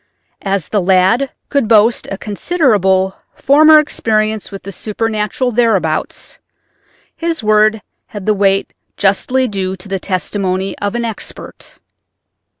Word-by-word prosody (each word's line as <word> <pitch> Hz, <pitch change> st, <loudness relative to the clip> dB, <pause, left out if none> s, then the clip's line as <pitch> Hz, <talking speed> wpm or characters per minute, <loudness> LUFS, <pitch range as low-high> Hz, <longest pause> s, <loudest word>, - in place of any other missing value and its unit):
As 195 Hz, -4 st, -2 dB
the 205 Hz, -, +1 dB
lad 190 Hz, +8 st, +2 dB, 0.2 s
could 280 Hz, -6 st, 0 dB
boast 225 Hz, +1 st, +3 dB
a 195 Hz, -, -4 dB
considerable 200 Hz, -, +1 dB, 0.2 s
former 310 Hz, +3 st, +6 dB
experience 215 Hz, -7 st, -1 dB
with 195 Hz, -, -8 dB
the 195 Hz, -, -7 dB
supernatural 215 Hz, +4 st, -2 dB
thereabouts 210 Hz, -9 st, -1 dB, 0.8 s
his 330 Hz, -6 st, -3 dB
word 215 Hz, 0 st, +3 dB, 0.2 s
had 205 Hz, -3 st, -8 dB
the 215 Hz, -, +3 dB
weight 195 Hz, -1 st, +1 dB, 0.2 s
justly 250 Hz, +7 st, +1 dB
due 190 Hz, -3 st, -3 dB
to 185 Hz, +2 st, -11 dB
the 195 Hz, -1 st, -3 dB
testimony 190 Hz, 0 st, -2 dB
of 205 Hz, +2 st, -2 dB
an 240 Hz, 0 st, -1 dB
expert. 225 Hz, -3 st, -8 dB
210 Hz, 125 wpm, -15 LUFS, 195-230 Hz, 0.8 s, former